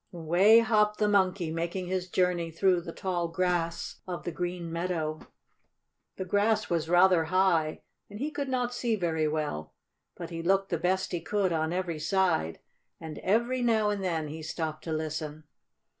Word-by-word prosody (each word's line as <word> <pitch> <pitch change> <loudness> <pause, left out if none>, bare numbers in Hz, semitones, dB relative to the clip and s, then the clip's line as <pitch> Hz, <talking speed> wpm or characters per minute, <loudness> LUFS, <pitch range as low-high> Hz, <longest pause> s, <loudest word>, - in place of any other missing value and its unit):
Away 180 +7 +5
hopped 210 -2 +2
the 210 - +2
Monkey, 190 -4 +2
making 170 +3 -3
his 185 0 -2
journey 180 -2 +1
through 180 +2 +2
the 165 - -7
tall 175 -1 -2
grass 170 -1 -1
of 180 -1 -5
the 175 - -3
green 175 0 -4
meadow. 165 -3 -2 1.0
The 190 - -4
grass 210 +3 +1
was 165 -2 0
rather 175 -1 +5
high, 170 -3 +1 0.3
and 205 - -9
he 290 +7 -3
could 285 -2 -3
not 250 -1 -1
see 240 -2 0
very 160 -5 0
well. 150 - -3 0.4
But 170 -1 -7
he 165 0 -4
looked 195 +3 +2
the 170 - -1
best 185 +3 0
he 175 -2 -2
could 195 0 0
on 160 0 0
every 175 -3 -2
side, 165 - +1 0.4
and, 160 -2 -7
every 235 +6 +1
now 220 -3 +2
and 200 -2 -3
then, 165 -4 -1
he 160 +2 -7
stopped 155 -1 -4
to 165 - -4
listen. 155 -1 -4
175 Hz, 175 wpm, -29 LUFS, 160-195 Hz, 1.0 s, Away